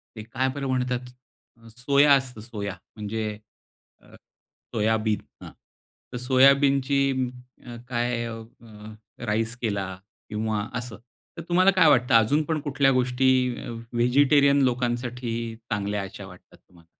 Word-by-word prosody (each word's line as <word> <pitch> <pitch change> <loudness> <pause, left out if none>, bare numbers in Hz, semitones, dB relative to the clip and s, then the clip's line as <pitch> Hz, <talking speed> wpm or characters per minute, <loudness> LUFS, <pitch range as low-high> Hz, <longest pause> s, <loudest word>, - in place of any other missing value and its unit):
ते 110 - -7
काय 130 +3 -2
बरं 140 -1 -3
म्हणतात, 125 -1 -2 0.7
सोया 140 +3 +4
असतं, 130 -5 0
सोया 105 -4 -6 0.2
म्हणजे 110 +1 -4 0.7
अ, - - -21 0.6
सोयाबीन 110 0 +1 0.2
हं. - - -10 0.6
तर - - -3
सोयाबीनची 135 +2 +3 0.7
अ, 120 -1 -8
काय 120 -1 -1
अ, 115 -1 -7 0.8
राईस 115 +2 -1
केला 100 -5 -2 0.3
किंवा 110 0 -2
असं, 120 -2 -6 0.4
तर - - -5
तुम्हाला 185 +2 +5
काय 185 -4 +4
वाटतं, 125 -4 +3
अजून 130 +7 +4
पण 155 0 -2
कुठल्या 140 -1 +2
गोष्टी 130 0 +1 0.7
व्हेजिटेरियन 140 +4 +4
लोकांसाठी 120 -1 -2 0.4
चांगल्या 105 -1 -2
अशा 95 +1 -9
वाटतात 90 -1 -16
तुम्हाला? 85 -2 -23
125 Hz, 120 wpm, -25 LUFS, 110-135 Hz, 0.8 s, तुम्हाला